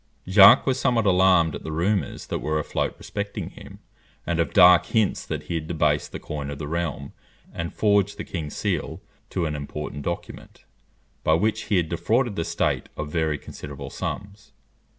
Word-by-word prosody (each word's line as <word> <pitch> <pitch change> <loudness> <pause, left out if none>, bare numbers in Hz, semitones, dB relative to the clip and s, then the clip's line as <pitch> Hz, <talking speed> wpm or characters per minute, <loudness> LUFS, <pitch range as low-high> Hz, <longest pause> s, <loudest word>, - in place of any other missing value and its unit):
Jacques 100 +1 +8
was 130 -1 +1
somewhat 120 -5 +2
alarmed 90 -4 +4
at - - -6
the 80 - -5
rumours 85 0 -1
that - - -3
were 75 +1 -1
afloat 75 - -2
respecting 100 0 -5
him, - - -12 0.5
and 85 -1 -1
of 85 - +1
dark 90 -2 +7
hints 110 -3 +1
that - - -5
he - - -5
had 80 -2 -3
debased 75 -3 0
the - - -5
coin 75 -2 -5
of 70 - -5
the 75 0 -5
realm 85 -1 -3 0.4
and 85 0 -4
forged 100 -1 +2
the 105 - -4
king's 80 -5 -6
seal 90 -4 -2 0.3
to 90 -3 -1
an 75 -1 -2
important 75 0 -6
document, 85 +4 -7 0.6
by 80 - +4
which 110 +5 0
he 100 - +1
had 85 -2 +1
defrauded 105 +8 0
the 85 - -1
state 85 0 -1
of 75 -1 -5
very 80 -2 0
considerable 70 -1 -9
sums. 100 0 -6
85 Hz, 180 wpm, -24 LUFS, 75-100 Hz, 0.6 s, Jacques